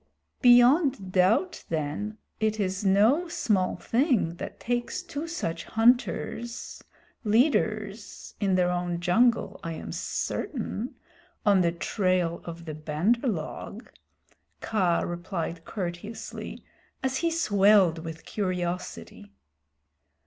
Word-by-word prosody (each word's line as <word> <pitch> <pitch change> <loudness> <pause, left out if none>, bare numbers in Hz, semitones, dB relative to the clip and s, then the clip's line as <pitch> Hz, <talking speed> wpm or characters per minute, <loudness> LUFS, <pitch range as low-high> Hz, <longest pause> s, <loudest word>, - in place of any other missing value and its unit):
"Beyond 245 - +5
doubt 205 - +2
then 165 +7 -3 0.2
it 215 0 0
is 190 0 -1
no 215 - +4
small 200 - 0
thing 235 - +1
that - - -7
takes 245 +10 -2
two 330 -2 -5
such 170 - -3
hunters 235 0 0 0.4
leaders 215 -3 0
in 195 -3 +2
their 180 -1 +2
own 175 -1 -2
jungle 225 +7 +2
I 165 - -3
am - - -7
certain 245 - -3 0.5
on 200 -3 +5
the 170 -1 +2
trail 180 -1 0
of 170 0 -8
the 155 - -5
Bandar 155 - 0
log," 200 +5 -5 0.7
Kaa 185 -6 +1
replied 175 -1 -4
courteously, 185 +3 -6 0.4
as 265 0 0
he 335 - +1
swelled 205 - +4
with 165 0 -8
curiosity. 180 -3 -4
200 Hz, 105 wpm, -27 LUFS, 175-240 Hz, 0.7 s, Beyond